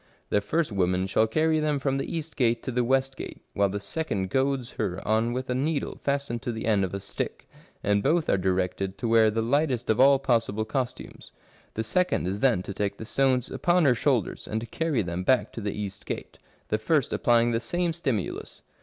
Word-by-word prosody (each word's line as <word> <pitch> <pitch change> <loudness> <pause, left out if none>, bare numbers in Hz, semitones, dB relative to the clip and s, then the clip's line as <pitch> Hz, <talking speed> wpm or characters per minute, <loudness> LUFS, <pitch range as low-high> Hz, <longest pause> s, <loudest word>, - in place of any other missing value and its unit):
The 105 - +3
first 155 +8 0
woman 90 -1 +1
shall 110 +3 +2
carry 155 +6 +2
them 150 -1 +1
from 135 0 0
the - - -4
east 160 -2 -4
gate 120 -3 +1
to 130 - -3
the 125 0 +1
west 135 +2 +1
gate, - - -8
whilst 100 -1 +1
the 100 - -2
second 100 - -3
goads 135 -2 0
her 95 -4 -1
on 110 +2 +2
with 130 +2 -3
a 125 - -1
needle 145 +3 -1
fastened 140 -4 -1
to 125 -2 -3
the 110 -1 -5
end 105 -3 +3
of 95 +1 -2
a - - -3
stick," - - -5 0.4
and 100 0 +2
both 165 +7 +2
are 100 - +2
directed 95 +1 -1
to 120 - -2
wear 115 -1 +5
the 110 +1 -1
lightest 125 -2 +1
of 110 - 0
all 135 +1 +7
possible 115 -5 0
costumes. 125 +2 -4 0.2
" - - -31
The 110 - -1
second 180 - +1
is 95 +3 -2
then 115 -7 +3
to 100 - -6
take 100 0 -2
the 110 - -7
stones 130 0 +1
upon 175 -1 +2
her 130 - +6
shoulders 125 -1 0
and 110 - -1
to - - -5
carry 145 -1 -1
them 85 +1 -3
back 130 +6 +2
to 115 - -6
the 100 0 -2
east 100 -2 -6
gate, - - -6 0.3
the 110 - +1
first 140 +4 +1
applying 120 0 +3
the 115 - +1
same 170 +8 -1
stimulus." 130 - -3
120 Hz, 220 wpm, -27 LUFS, 105-135 Hz, 0.4 s, all